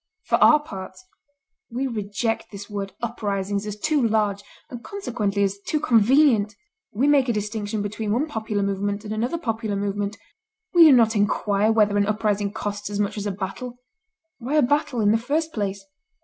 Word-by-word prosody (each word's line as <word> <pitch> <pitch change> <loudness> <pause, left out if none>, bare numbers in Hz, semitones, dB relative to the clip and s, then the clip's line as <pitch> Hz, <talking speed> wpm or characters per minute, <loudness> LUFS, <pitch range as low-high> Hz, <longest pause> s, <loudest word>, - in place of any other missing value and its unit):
For - - +2
our 305 0 +7
parts, 200 - -9 0.6
we 250 +3 -2
reject 225 -1 -2
this 200 0 -9
word 200 -2 -5
uprisings 205 -3 -2
as 210 0 -5
too 305 +3 +1
large, 210 -3 +1 0.3
and 240 -1 -8
consequently 225 - -2
as 200 0 -1
too 305 +9 -2
convenient. 230 -3 +4 0.4
We 250 +7 +1
make 280 -3 +4
a - - +2
distinction 210 0 -3
between 210 +1 -3
one 250 +7 +1
popular 220 -8 -2
movement 200 +1 -2
and 210 - -4
another 240 +9 -1
popular 225 -7 -2
movement. 200 +1 -2 0.6
We 345 -2 +8
do 310 - +8
not 230 -3 +5
inquire 205 +1 +2
whether 210 -2 +3
an 200 0 +2
uprising 210 -1 0
costs 205 0 -4
as 205 0 -4
much 205 -1 0
as 205 -1 -3
a - - -1
battle. 200 +6 -6 0.6
Why 260 +5 -3
a 305 - +5
battle, 290 -1 +1
in 205 -1 +4
the 225 - +3
first 310 +7 -1
place? 200 -2 -3
215 Hz, 175 wpm, -23 LUFS, 205-245 Hz, 0.6 s, We